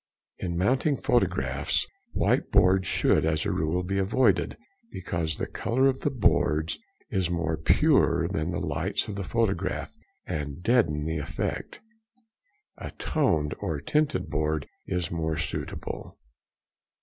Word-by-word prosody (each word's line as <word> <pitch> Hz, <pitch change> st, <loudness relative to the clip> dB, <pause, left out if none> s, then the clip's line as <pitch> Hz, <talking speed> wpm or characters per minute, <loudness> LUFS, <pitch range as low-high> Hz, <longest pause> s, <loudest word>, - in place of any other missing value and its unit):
In 85 Hz, -2 st, -3 dB
mounting 130 Hz, -, +2 dB
photographs, 70 Hz, -, +1 dB, 0.3 s
white -, -, +1 dB
boards 95 Hz, +1 st, +4 dB
should, -, -, +3 dB
as 80 Hz, -1 st, +1 dB
a -, -, 0 dB
rule, 80 Hz, +4 st, 0 dB
be 100 Hz, +2 st, -1 dB
avoided, 100 Hz, +2 st, +2 dB, 0.3 s
because 85 Hz, -3 st, -3 dB
the -, -, -2 dB
colour 130 Hz, +3 st, 0 dB
of 135 Hz, -1 st, +2 dB
the -, -, 0 dB
boards 80 Hz, -, +1 dB, 0.3 s
is 95 Hz, -4 st, 0 dB
more 85 Hz, -2 st, 0 dB
pure 80 Hz, -, +3 dB
than 80 Hz, +2 st, -2 dB
the 85 Hz, -, -2 dB
lights 85 Hz, +4 st, -1 dB
of 105 Hz, -, -4 dB
the 100 Hz, 0 st, -4 dB
photograph, 110 Hz, 0 st, -1 dB, 0.3 s
and 75 Hz, +2 st, -4 dB
deaden 90 Hz, -12 st, +2 dB
the 80 Hz, 0 st, -1 dB
effect. 70 Hz, -, -4 dB, 1.0 s
A -, -, -5 dB
toned 80 Hz, -, 0 dB
or 75 Hz, -3 st, -2 dB
tinted 145 Hz, -, 0 dB
board 75 Hz, -2 st, 0 dB, 0.2 s
is 90 Hz, -3 st, -2 dB
more 80 Hz, -2 st, -1 dB
suitable. -, -, -5 dB
85 Hz, 135 wpm, -27 LUFS, 80-105 Hz, 1.0 s, boards